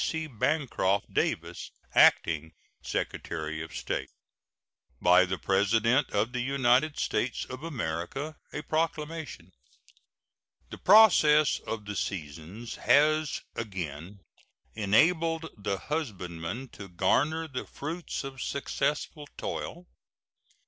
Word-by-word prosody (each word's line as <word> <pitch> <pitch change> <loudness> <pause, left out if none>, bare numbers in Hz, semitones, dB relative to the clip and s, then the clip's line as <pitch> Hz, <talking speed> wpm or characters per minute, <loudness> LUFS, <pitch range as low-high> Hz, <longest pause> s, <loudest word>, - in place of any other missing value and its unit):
C. 160 -1 -1
BANCROFT 130 -7 0
DAVIS, - - -1 0.2
Acting 80 0 +4 0.3
Secretary 80 -1 -3
of 80 - -8
State. - - -3 0.9
BY 90 +1 +6
THE 95 +1 -3
PRESIDENT 110 +8 +2
OF 105 +4 0
THE 125 - -1
UNITED 135 +3 +2
STATES 120 +3 -1
OF 130 +1 -8
AMERICA. 135 - -4 0.2
A 150 - -5
PROCLAMATION. 155 - -3 1.2
The - - -8
process 165 -8 +6
of 110 -2 -4
the 105 0 -5
seasons 90 +5 -5
has 155 +1 +3
again 95 -2 -6 0.5
enabled 160 - +2
the 100 -2 -2
husbandman 105 - -4
to 100 -3 -10
garner 145 - +1
the 130 -4 -5
fruits 165 +4 -5
of 135 -2 -7
successful 145 +1 -2
toil. 175 +2 -5
125 Hz, 100 wpm, -29 LUFS, 95-155 Hz, 1.2 s, BY